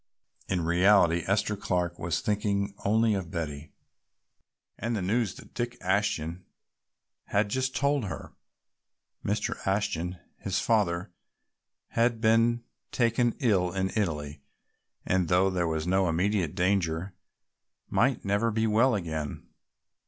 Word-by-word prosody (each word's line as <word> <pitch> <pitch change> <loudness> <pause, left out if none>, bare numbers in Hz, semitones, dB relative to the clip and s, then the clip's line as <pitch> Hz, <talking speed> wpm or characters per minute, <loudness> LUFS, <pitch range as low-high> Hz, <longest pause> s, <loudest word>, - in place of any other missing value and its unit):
In 90 -2 0
reality 85 0 +4
Esther 100 +2 +1
Clark 90 -3 -1
was 85 0 -1
thinking 100 -1 0
only 110 +2 +3
of 95 -4 -3
Betty 75 -3 -5 1.0
and 115 +2 -2
the 105 - -1
news 105 +1 0
that - - -14
Dick 120 0 -3
Ashton 90 -3 -1 0.8
had 105 +1 +1
just 130 +3 -1
told 140 -3 +1
her. - - -7 0.9
Mr. 105 +1 -1
Ashton, 90 -3 -1 0.2
his - - -2
father, 85 +3 +1 0.8
had 115 0 +1
been 115 +1 +3 0.3
taken 120 -1 +2
ill 95 -8 +2
in 95 0 -1
Italy 75 -8 -2 0.6
and, 90 -2 +1
though 90 +3 +3
there 90 -2 0
was 80 -1 -1
no 95 0 +2
immediate 90 0 0
danger, 90 -1 0 0.7
might 130 -2 +1
never 100 +4 +2
be 110 0 0
well 115 +3 +3
again. 80 -6 -4
95 Hz, 125 wpm, -28 LUFS, 85-110 Hz, 1.0 s, reality